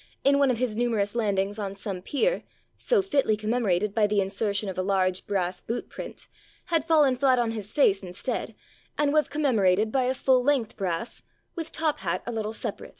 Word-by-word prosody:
in 280 0 +4
one 280 -1 +4
of 250 - +1
his 240 -3 -1
numer 235 -1 0
ous 200 0 0
landings 205 -2 0
on 200 -1 -4
some 195 -2 -5
pier 470 - 0 0.3
(so 460 -6 +1
fitly 275 - +1
commemorated 210 -3 0
by 215 -1 +3
the 205 0 +1
insertion 200 +1 -1
of 190 - -4
a 185 - -1
large 185 -1 0
brass 185 -3 -1
boot 235 - -4
print), - - -8 0.5
had 325 -3 +3
fallen 300 -5 +4
flat 260 0 +3
on 235 -2 +1
his 215 -2 -6
face 205 -10 +3
instead, 180 0 -4 0.4
and 295 -1 +2
was 305 -1 +3
commemor 275 -8 +1
ated 210 +4 +2
by 260 0 +1
a 260 +1 0
full 255 -1 +3
length 265 -5 +1
brass, 185 +2 -3 0.3
with 330 -2 -5
top 315 -2 0
hat 180 -1 -2
a 240 - -3
little 220 -2 -3
separate. 225 - -6
220 Hz, 205 wpm, -26 LUFS, 195-270 Hz, 0.5 s, in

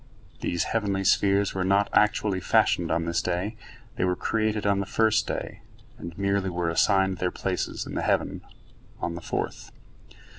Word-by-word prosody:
These 85 - -1
heavenly 100 -4 -1
spheres 100 +1 +3
were 95 - -1
not 100 +2 +3
actually 105 -2 +2
fashioned - - +2
on 85 +1 0
this 85 0 0
day; 90 +5 -2 0.4
they - - 0
were 90 0 +1
created 110 +1 -1
on 100 -1 +2
the 100 - -3
first 110 0 +2
day, - - -4 0.4
and 85 -1 -8
merely 100 -1 0
were 85 -1 -1
assigned 95 +1 +2
their 90 - +1
places 90 0 -3
in - - -8
the - - -1
heavens - - 0 0.6
on 85 - -2
the 85 - -7
fourth. - - -4
95 Hz, 170 wpm, -26 LUFS, 90-100 Hz, 0.6 s, spheres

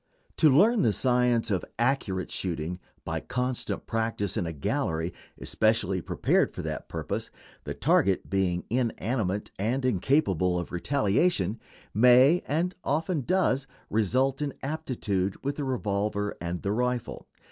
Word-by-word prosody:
To 155 - +6
learn 210 - +5
the 110 -4 +3
science 125 -2 +2
of 95 - 0
accurate 115 -7 0
shooting 90 -1 -3 0.3
by - - -2
constant 125 0 -3
practice 115 -3 -2
in 95 -7 -1
a - - -3
gallery 80 +2 -2 0.3
especially 110 -4 +1
prepared - - +1
for - - -7
that - - -5
purpose, - - -4 0.4
the - - -4
target 95 -1 +2
being 95 -2 0
inanimate 115 -4 -1
and 125 +6 0
incapable 95 - +2
of 85 - -4
retaliation, 110 - +1 0.3
may, 125 - +6
and 170 +5 0
often 160 +2 0
does, 140 -4 +1 0.2
result 130 +6 +1
in 145 -2 -2
aptitude 120 -11 -2
with 140 +1 -1
the 145 - -2
revolver 105 -4 -1
and 85 0 -4
the 100 - 0
rifle. 125 +1 -2
115 Hz, 135 wpm, -27 LUFS, 95-135 Hz, 0.4 s, To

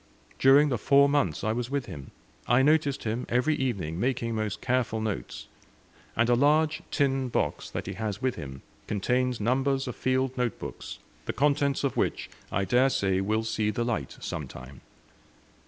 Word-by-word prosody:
During 140 +3 +6
the 120 -5 -1
four 140 +4 +5
months 140 - 0
I 110 - +1
was 120 +1 -2
with 140 -2 -2
him, 70 -2 -9 0.4
I 125 +2 +4
noticed 145 -1 +2
him 115 +3 -2
every 125 +6 +2
evening 100 - -2
making 120 -1 -1
most 110 -2 -2
careful 125 -3 0
notes; 105 - -4 0.7
and 115 +1 +2
a 120 - +4
large 150 +5 +3
tin 135 -3 +1
box - - -1
that - - -5
he - - -4
has 105 -2 -4
with 130 -1 0
him 65 -1 -8 0.2
contains 125 +4 0
numbers 135 +4 +1
of 125 - -4
field 130 0 0
note 125 -3 0
books, - - -7 0.3
the - - -1
contents 140 +1 +1
of 140 - -1
which - - -1 0.2
I 100 +1 0
dare 125 +7 +4
say 95 -6 +1
will 110 +3 0
see 110 -1 -1
the 120 +3 -1
light 110 - -3
some - - -5
time. 65 +1 -11
125 Hz, 175 wpm, -27 LUFS, 110-135 Hz, 0.7 s, During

